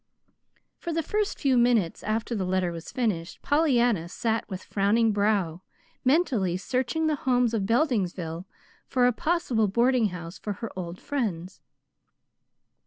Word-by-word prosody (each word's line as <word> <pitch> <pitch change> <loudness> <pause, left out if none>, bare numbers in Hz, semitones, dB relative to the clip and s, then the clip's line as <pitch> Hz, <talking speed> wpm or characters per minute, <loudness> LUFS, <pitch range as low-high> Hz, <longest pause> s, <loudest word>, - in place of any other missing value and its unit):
For 340 - -4
the 330 0 -1
first 420 +5 -1
few 265 -4 +3
minutes 235 -8 +2
after 220 +3 -2
the 205 -4 -1
letter 185 -1 0
was 165 0 -8
finished, 200 -9 -2
Pollyanna 245 - +2
sat 225 +4 -2
with 185 -2 -6
frowning 215 +3 +2
brow, 200 -5 +1 0.4
mentally 250 - +2
searching 260 - -1
the 310 -2 +1
homes 245 -2 +3
of 200 -4 0
Beldingsville 190 - 0 0.4
for 250 -2 +2
a 250 - +5
possible 305 -8 +1
boarding 235 +3 +3
house 175 -2 -8
for 210 - -3
her 230 +3 -6
old 180 -1 -6
friends. 195 - -3
220 Hz, 140 wpm, -27 LUFS, 185-255 Hz, 0.4 s, a